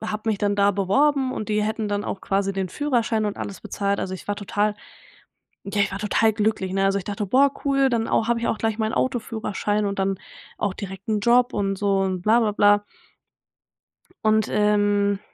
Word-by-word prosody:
habe 220 0 -3
mich 205 - -1
dann 205 0 +1
da 200 0 +3
beworben 260 +8 +2
und 215 - -5
die 210 0 +1
hätten 220 0 -2
dann 205 0 -2
auch 195 - -4
quasi 195 0 0
den 190 -1 -2
Führerschein 230 - 0
und 205 -1 -2
alles 200 - -6
bezahlt. 200 0 -2
Also 190 0 -3
ich 190 - -11
war 205 - -1
total, 205 +1 -1 0.9
ja 200 +1 -2
ich 200 - 0
war 195 - -4
total 220 +1 +2
glücklich, 210 -3 -1
ne? 195 0 +1
Also 195 0 +2
ich 190 - -7
dachte: 205 +1 -3
„Boah 270 +7 +4
cool, 275 -1 +3
dann 230 -2 0
au 225 - +1
habe 235 -1 +2
ich 230 - -1
auch - - -1
gleich 220 0 -1
meinen 220 0 0
Autoführerschein 215 -4 -1
und 200 0 -3
dann 195 -1 0 0.4
auch 200 - -1
direkt 195 -1 -8
'n 215 -1 +1
Job 245 +3 +3
und 195 -1 -1
so 200 -1 +1
und 190 -2 -1
bla, 220 +5 +4
bla, 215 -3 +1
bla“. 205 0 +4 1.4
Und, 215 -1 +3
ähm 205 -1 +2
210 Hz, 205 wpm, -23 LUFS, 200-220 Hz, 1.4 s, Boah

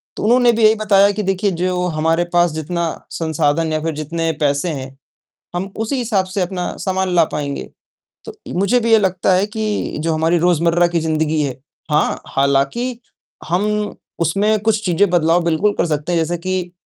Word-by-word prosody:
तो - - -5
उन्होंने 240 +2 +4
भी 225 -1 0
यही 215 +1 +6
बताया 200 -2 +4
कि 210 +1 -3
देखिए 195 +1 0
जो 180 +1 -1
हमारे 165 +1 +1
पास 175 -1 +3
जितना 165 +3 -3 0.3
संसाधन 160 0 0
या 155 - 0
फ़िर 165 0 -2
जितने 165 +2 -2
पैसे 145 +4 +1
हैं, 135 -2 -6 0.6
हम 190 +2 -3
उसी 225 +5 -2
हिसाब 215 -6 0
से 185 +1 -3
अपना 180 0 -3
सामान 190 -1 -1
ला 170 - +6
पाएँगे। 140 -2 -4 0.6
तो 445 - -8 0.3
मुझे 200 +6 +3
भी 230 0 0
ये 220 - +7
लगता 185 -1 +1
है 190 +2 +3
कि 215 -1 -2
जो 160 +1 0
हमारी 165 +2 +2
रोज़मर्रा 170 0 +3
की 170 -1 0
ज़िंदगी 155 -1 0
है 130 -2 -4 0.3
हाँ, 150 - +1
हालाँकि 140 - 0 0.5
हम 210 +3 0 0.2
उसमें 205 +6 +1
कुछ 215 -1 0
चीज़ें 180 +2 +2
बदलाव 170 0 +2
बिल्कुल 170 +5 +1
कर - - +1
सकते 150 +1 -2
हैं, 170 - +2
जैसे 170 +2 -1
कि, 180 0 -3
175 Hz, 180 wpm, -18 LUFS, 160-205 Hz, 0.6 s, ये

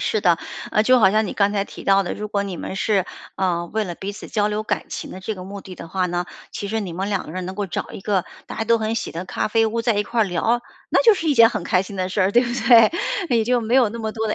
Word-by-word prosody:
是 215 - 0
的。 175 -3 +4 0.3
啊， 215 - +3
就 255 +2 +5
好 190 -3 +6
像 215 +1 +2
你 - - -4
刚 200 0 +2
才 200 -1 0
提 - - -11
到 195 0 +4
的， 180 - -4
如 210 0 -5
果 200 -1 0
你 190 -4 -5
们 190 - -5
是， 195 -2 +1 0.3
呃， 175 -3 0
为 220 -1 0
了 175 -2 -5
彼 200 +3 -5
此 - - -10
交 210 -2 +1
流 210 +1 -1
感 - - -2
情 - - -6
的 185 - -8
这 210 +3 -4
个 185 -1 -9
目 200 +1 -8
的 185 - -10
的 170 - -10
话 185 +2 0
呢， 175 0 -2 0.2
其 200 - -5
实 225 +1 -1
你 185 -4 -5
们 190 +4 -3
两 200 -2 -1
个 155 - -9
人 185 -1 -4
能 185 - -5
够 205 - -2
找 - - -4
一 - - -8
个 195 -3 0 0.2
大 - - -7
家 225 - 0
都 230 +1 +4
很 220 0 -1
喜 230 - -3
的 170 +3 -5
咖 195 - -2
啡 225 +1 +3
屋 225 +1 -1
在 230 -2 +1
一 205 - +1
块 230 +2 -1
儿 - - +5
聊， 215 +6 0 0.3
那 - - +4
就 455 -3 +7
是 335 - -4
一 295 - +3
件 230 -2 +8
很 - - -4
开 180 0 +2
心 195 +1 -9
的 185 0 -2
事 195 - -1
儿， 185 +1 +3
对 240 - +5
不 240 - -3 0.2
对？ 230 0 +8 0.5
也 220 - +1
就 245 0 +1
没 230 +3 0
有 255 -4 +5
那 230 +3 -7
么 220 -1 -3
多 220 -1 -2
的， - - 0
205 Hz, 345 characters per minute, -22 LUFS, 190-225 Hz, 0.5 s, 件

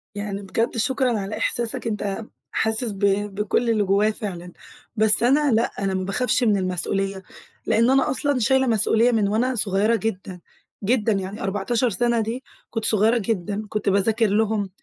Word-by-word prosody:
يعني 205 -1 -4
بجد 225 +5 -2
شكرًا 250 0 +1
على 200 +2 -4
إحساسك، 230 0 -2
أنت 210 0 -3 0.3
حاسس 220 +1 -1
ب 195 - -9 0.4
بكُلّ 210 +3 0
اللي 215 -2 +2
جوايا 200 +2 +2
فعلًا. 180 -5 -7 0.4
بس 220 +1 +3
أنا 280 +3 +3
لأ، 225 +1 +2
أنا 195 -1 -1
ما 185 - -1
باخافش 250 +5 0
من 210 -3 +3
المسؤولية، 190 +1 -1 0.4
لأن 230 +2 +3
أنا 270 0 +3
أصلًا 285 0 0
شايلة 265 +3 +2
مسؤولية 225 +2 +3
من 215 -3 +2
وأنا 245 +5 0
صغيّرة 205 +2 +1
جدًا 195 -4 -4 0.4
جدًا، 220 +1 +1
يعني 195 +1 -4
14 205 +5 0
سَنة 235 +3 +1
دي 235 +5 -4 0.3
كُنت 225 -2 -3
صغيرة 220 +3 +3
جدًا، 210 -1 -2
كُنت 210 -1 -1
باذاكر 215 +3 +2
لهم، 210 -1 0
215 Hz, 160 wpm, -23 LUFS, 200-235 Hz, 0.4 s, بس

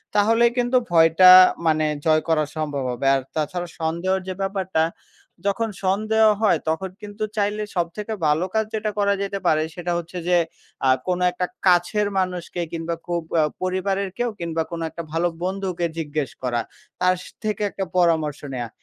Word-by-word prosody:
তাহলে 225 +3 +4
কিন্তু 245 +1 +2
ভয়টা 165 +2 +6 0.4
মানে 155 -1 +3 0.2
জয় 155 0 +4
করার 155 -2 +1
সম্ভব 145 -3 -2
হবে 125 +3 -2
আর 135 - 0
তাছাড়া 175 +3 -2
সন্দেহর 170 +4 0
যে 185 - -2
ব্যাপারটা, 190 -4 0 0.7
যখন 225 +3 -1 0.2
সন্দেহ 215 +3 +2 0.2
হয় 215 - +3
তখন 190 +4 -1
কিন্তু 210 +1 -6
চাইলে 210 +1 0
সবথেকে 185 +5 -2
ভালো 150 +4 +2
কাজ 220 0 +1
যেটা 215 -1 -1
করা 200 0 +3
যেতে 200 0 -3
পারে 155 0 +3
সেটা 175 0 -3
হচ্ছে 170 +1 -6
যে 175 - +5 0.5
আ - - +4 0.2
কোনো 180 0 0
একটা 180 0 -2 0.2
কাছের 180 +4 +3
মানুষকে 180 -1 -3
কিংবা 165 0 -3
খুব 175 -1 -1 0.2
আ - - +5 0.2
পরিবারের 190 +1 -1
কেউ 240 0 0
কিংবা 165 -1 -1
কোনো 165 -1 -4
একটা 170 - -7
ভালো 165 +2 +1 0.2
বন্ধুকে 185 -2 -2
জিজ্ঞেস 150 -3 -3
করা, 120 -2 0 0.4
তার 185 0 +3
স - - -11 0.2
থেকে 215 0 -2
একটা 195 - -3
পরামর্শ 160 -4 +2
নেওয়া, 120 -2 -4
180 Hz, 165 wpm, -23 LUFS, 160-200 Hz, 0.7 s, ভয়টা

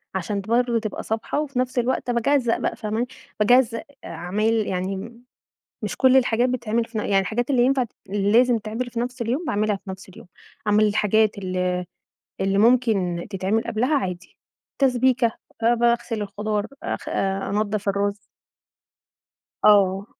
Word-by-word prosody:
عشان 200 +2 -2
ت 195 - -15
برضو 240 +1 +2
تبقى 215 -2 -4
صابحة، 220 +6 -2
وفي 275 -4 -3
نَفس 255 0 0
الوقت 245 0 0
باجزّأ 240 0 +2
بقى - - -2
فاهماني؟ 220 +2 -2 0.3
باجزّأ 230 +1 +3 0.2
عمايل 190 +7 -1
يعني 195 +6 -4 0.6
مش - - -3
كُلّ 260 0 +5
الحاجات 245 -1 +3
بتتعمل 235 -2 -1
في 230 -1 -6
ن - - +1
يعني 200 -2 +2
الحاجات 230 +7 -2
اللي 255 -3 +3
ينفع 265 0 +2
ت 230 - -14 0.2
لازم 220 +5 +3
تتعمل 225 +4 -4
في 235 -1 -3
نَفس 250 +1 -3
اليوم 255 +9 -1
باعملها 210 0 0
في 195 - -10
نَفس 190 0 -9
اليوم، 185 - -14 0.4
أعمل 210 +1 +4
الحاجات 210 0 +2
ال 180 -1 -1 0.6
اللي 195 0 +1
ممكن 210 -7 +2
تتعمل 195 +3 0
قبلها 250 +7 0
عادي، 180 -7 -5 0.4
تسبيكة، 255 -2 +3 0.3
آآ، 235 +1 +5
باغسل 235 -1 +1
الخضار 210 +1 -2 0.2
آآ، - - -2
خ - - -9
أنضف 200 +1 -1
الرز. 200 +1 0 1.5
آه. 195 -2 +5
220 Hz, 150 wpm, -23 LUFS, 200-245 Hz, 1.5 s, كُلّ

